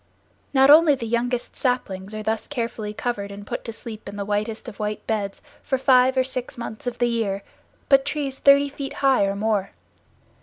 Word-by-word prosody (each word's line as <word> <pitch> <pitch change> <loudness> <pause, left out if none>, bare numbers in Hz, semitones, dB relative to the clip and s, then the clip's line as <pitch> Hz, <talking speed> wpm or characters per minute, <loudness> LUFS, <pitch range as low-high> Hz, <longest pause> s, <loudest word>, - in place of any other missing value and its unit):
Not 270 0 +6
only 310 -1 +7
the 240 - -6
young 235 +2 0
saplings 215 -6 -3
are 215 - -5
thus 220 +1 -2
carefully 230 -5 -4
covered 210 -2 -3
and 200 0 -9
put - - -5
to 230 - -4
sleep 220 -2 -8
in 200 - -9
the 200 -1 -4
whitest 215 +3 -2
of 225 -3 -9
white 210 0 -3
beds 205 -3 -3 0.2
for 265 - -1
five 260 0 +4
or 260 - +4
six 255 -1 -3
months 235 0 -7
of 245 - -3
the 240 - +2
year, 220 -4 -1 0.4
but 275 -1 +5
trees 280 -2 -3
thirty 280 0 +6
feet 280 -1 -6
high 265 -7 +5
or 195 0 -1
more. 205 -2 -1
235 Hz, 195 wpm, -23 LUFS, 210-265 Hz, 0.4 s, only